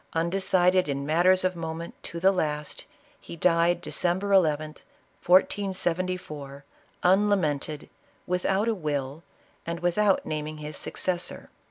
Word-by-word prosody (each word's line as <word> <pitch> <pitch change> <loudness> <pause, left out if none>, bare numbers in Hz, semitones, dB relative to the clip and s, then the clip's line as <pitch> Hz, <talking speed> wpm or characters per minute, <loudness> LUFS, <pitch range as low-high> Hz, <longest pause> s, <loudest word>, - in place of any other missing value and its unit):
Undecided 180 +1 +2
in 140 0 -2
matters 180 +5 +4
of 185 0 0
moment, 165 0 -5
to 170 - -6
the 190 +3 +5
last, 150 -5 -3 0.3
he - - -10
died 170 +1 +2
December 180 +3 -1
llth, 165 -6 +4 0.7
1474, 180 -6 0 0.4
unlamented, 180 -6 +1 0.4
without 190 +4 0
a 230 - +2
will, 145 -5 -3 0.4
and 170 0 -5
without 190 +3 +2
naming 155 0 -4
his 150 0 -7
successor. 180 -1 -3
175 Hz, 115 wpm, -26 LUFS, 155-185 Hz, 0.7 s, the